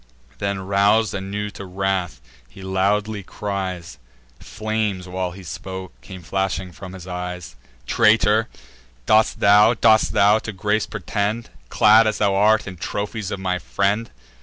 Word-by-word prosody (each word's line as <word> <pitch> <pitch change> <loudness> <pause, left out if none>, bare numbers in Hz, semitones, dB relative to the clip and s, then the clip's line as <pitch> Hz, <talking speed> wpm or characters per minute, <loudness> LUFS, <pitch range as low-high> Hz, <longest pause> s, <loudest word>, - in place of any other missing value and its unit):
Then, 100 -1 -2
rous'd 100 +2 +2
anew 100 +2 -4
to - - -9
wrath, 95 -6 -2 0.3
he 95 +3 -13
loudly 100 +3 0
cries 95 -5 -5 0.4
(Flames, 110 -4 -3
while 90 0 -3
he 95 +2 -11
spoke, 95 +3 -7
came 95 -3 -11
flashing 95 +2 -2
from 95 +2 -10
his 90 -2 -10
eyes) 90 -6 -6 0.3
"Traitor, 110 0 +3 0.6
dost 110 - +3
thou, 105 +3 +6
dost 110 -1 +4
thou 105 +2 +4
to 110 - -6
grace 105 +3 -1
pretend, 110 +2 -3 0.2
Clad, 110 +1 +5
as 110 - 0
thou 100 -2 +2
art, 105 +2 +3
in 95 -2 -8
trophies 100 +3 -4
of 100 - -4
my 90 -1 -1
friend? 100 +5 -1
100 Hz, 140 wpm, -21 LUFS, 95-105 Hz, 0.6 s, thou